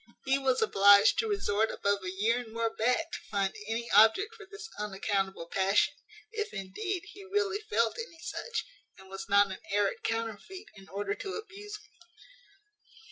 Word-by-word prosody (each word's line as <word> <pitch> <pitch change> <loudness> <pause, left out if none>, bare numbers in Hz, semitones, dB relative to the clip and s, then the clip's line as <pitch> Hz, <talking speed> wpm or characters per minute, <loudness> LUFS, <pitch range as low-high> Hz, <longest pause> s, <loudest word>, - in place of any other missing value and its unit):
He 270 +1 +2
was 260 -3 +2
obliged 200 0 +6
to 445 - +1
resort 220 - +1
above 200 0 0
a 185 - -3
year 215 +6 +1
and 235 -3 -8
more 230 0 -1
back 250 +9 +1
to - - -4
find 195 -1 0
any 230 +1 -2
object 220 - +5
for 425 -3 -13
this 410 +2 -9
unaccountable 195 -3 -2
passion, 195 +3 +2 0.4
if, 430 -2 -3
indeed, 350 - -4
he 400 - -12
really 405 0 0
felt 230 - +1
any 455 -8 -7
such, 465 +7 -4 0.3
and 190 0 -15
was 195 0 -7
not 200 0 +5
an 190 - -6
arrant 200 0 +1
counterfeit 230 - -4
in 195 -1 -15
order 200 +1 -2
to 390 - -5
abuse 415 -1 -8
me. - - -23
225 Hz, 170 wpm, -30 LUFS, -, 0.4 s, obliged